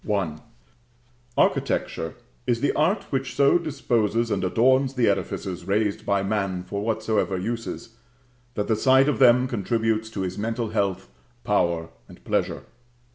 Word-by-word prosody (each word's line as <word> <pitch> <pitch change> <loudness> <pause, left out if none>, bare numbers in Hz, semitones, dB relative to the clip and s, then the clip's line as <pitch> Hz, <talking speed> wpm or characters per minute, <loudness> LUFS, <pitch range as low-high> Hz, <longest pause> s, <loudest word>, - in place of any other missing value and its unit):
Architecture 80 - 0 0.3
is 120 -2 +1
the 145 - +1
art 175 +8 +1
which 135 -2 -2
so 140 +6 +4
disposes 120 -7 0
and 95 -2 0
adorns 130 +7 +3
the 125 -2 +2
edifices 95 -2 -2
raised 100 +1 0
by 100 -1 +2
man 100 -3 -1
for 100 +2 -4
whatsoever 110 -3 0
uses, 115 +2 -5 0.6
that 105 - -1
the 110 - +2
sight 130 +5 +4
of 150 - 0
them 125 0 +6
contributes 110 -1 -1
to 105 -3 -5
his 95 +1 -3
mental 115 +1 -2
health, 100 - -1 0.4
power 85 -2 +1 0.2
and - - -15
pleasure. - - -1
110 Hz, 135 wpm, -24 LUFS, 100-125 Hz, 0.6 s, them